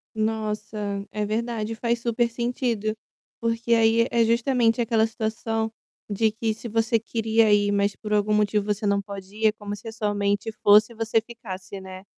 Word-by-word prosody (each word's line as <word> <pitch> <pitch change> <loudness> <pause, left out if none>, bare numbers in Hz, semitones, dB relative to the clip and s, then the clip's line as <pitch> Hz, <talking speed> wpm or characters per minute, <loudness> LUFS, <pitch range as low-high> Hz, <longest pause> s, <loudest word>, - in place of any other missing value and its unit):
Nossa. 215 -1 -2 0.3
É 210 0 -2
verdade, 225 0 -2
faz 235 +1 -1
super 235 0 0
sentido, 235 -2 -1 0.4
porque 230 0 0
aí 230 +1 +4
é 235 -1 +4
justamente 235 0 +2
aquela 225 -1 +2
situação 225 0 -2 0.4
de 215 +1 +1
que 220 0 -1
se 230 +2 -8
você 225 +1 +2
queria 225 -1 +2
ir, 205 0 +4
mas 200 0 +1
por 210 -1 -5
algum 210 0 +2
motivo 210 -1 +2
você 210 0 -1
não 200 0 +2
pode 195 0 -9
ir, 220 0 +3
é 215 - +4
como 205 -1 -6
se 205 +3 -12
a - - -4
sua 210 -2 -2
mente 205 +2 0
fosse 210 +3 +6
e - - -18
você 225 0 +1
ficasse, 200 -5 -8
né. 185 0 -9
220 Hz, 180 wpm, -25 LUFS, 210-230 Hz, 0.4 s, fosse